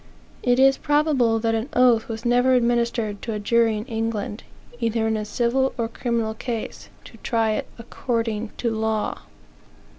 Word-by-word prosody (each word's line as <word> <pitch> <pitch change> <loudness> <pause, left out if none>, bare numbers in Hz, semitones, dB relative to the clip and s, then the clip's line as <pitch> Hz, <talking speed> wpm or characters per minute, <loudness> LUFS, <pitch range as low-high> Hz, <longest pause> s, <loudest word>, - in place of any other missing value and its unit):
It 245 0 +2
is 270 +1 +5
probable 290 -6 +2
that 225 0 0
an 225 +5 -2
oath 245 -3 +4
was 225 +1 -6
never 245 +2 +4
administered 235 -3 0
to 230 - -4
a 210 - -3
jury 225 +1 +2
in 210 - -5
England, 225 -3 -3 0.4
either 230 -1 0
in 220 0 +1
a 215 - -2
civil 245 +4 0
or 230 -2 0
criminal 230 -1 -2
case, 230 0 -5
to - - -14
try 225 -2 0
it 215 - -2
according 230 -2 -3
to 235 - -1
law. 220 -1 -1
230 Hz, 160 wpm, -23 LUFS, 220-245 Hz, 0.4 s, is